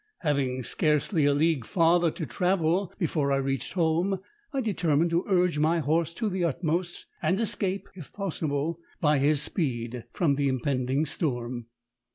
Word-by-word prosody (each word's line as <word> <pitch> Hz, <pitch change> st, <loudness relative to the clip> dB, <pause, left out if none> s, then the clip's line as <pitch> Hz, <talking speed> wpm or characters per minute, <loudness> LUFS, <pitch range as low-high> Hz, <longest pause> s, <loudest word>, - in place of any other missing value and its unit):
Having 135 Hz, -6 st, 0 dB
scarcely 150 Hz, -, +1 dB
a 145 Hz, -, +4 dB
league 155 Hz, -3 st, +2 dB
farther 170 Hz, -, +3 dB
to 160 Hz, 0 st, -5 dB
travel 180 Hz, +1 st, +1 dB
before 155 Hz, -6 st, 0 dB
I -, -, +4 dB
reached 135 Hz, -2 st, -2 dB
home, 175 Hz, +3 st, +1 dB, 0.3 s
I 275 Hz, -, -1 dB
determined 170 Hz, -, +1 dB
to 170 Hz, +2 st, +2 dB
urge 180 Hz, -5 st, +2 dB
my 160 Hz, +3 st, +3 dB
horse 160 Hz, +2 st, +1 dB
to 225 Hz, -, -1 dB
the 185 Hz, -3 st, -1 dB
utmost, 170 Hz, +2 st, -1 dB, 0.2 s
and 175 Hz, +5 st, +1 dB
escape, 200 Hz, -3 st, -1 dB
if 175 Hz, -7 st, -11 dB
possible, 160 Hz, -4 st, -2 dB, 0.2 s
by 150 Hz, -2 st, +3 dB
his 145 Hz, +1 st, +2 dB
speed, 120 Hz, -, -2 dB
from 145 Hz, -6 st, +1 dB
the 140 Hz, -1 st, +1 dB
impending 130 Hz, +2 st, 0 dB
storm. 120 Hz, -5 st, -3 dB
160 Hz, 155 wpm, -27 LUFS, 140-175 Hz, 0.3 s, a